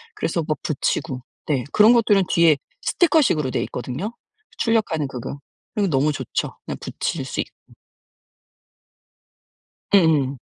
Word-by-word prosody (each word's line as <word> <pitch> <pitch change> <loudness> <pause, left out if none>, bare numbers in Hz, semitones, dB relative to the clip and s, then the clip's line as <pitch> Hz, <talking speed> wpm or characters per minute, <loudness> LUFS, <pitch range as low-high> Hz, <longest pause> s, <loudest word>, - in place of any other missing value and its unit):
그래서 170 - -1
뭐 155 -1 0
붙이고 135 -2 -2 0.3
네 140 -5 +1
그런 215 +3 +6
것들은 210 -5 +4
뒤에 165 -3 +5 0.2
스티커 325 -3 +3
식으로 150 - +1
돼 - - 0
있거든요. 130 - -5 0.4
출력하는 215 - +1
그거 130 +2 -6 0.3
그리고 205 -2 +1
너무 145 0 +2
좋죠, 130 -4 -3
그냥 - - -5
붙일 - - -3
수 - - -5
있고. - - -7 2.2
음음. 150 -8 +4
160 Hz, 275 characters per minute, -22 LUFS, 140-210 Hz, 2.2 s, 그런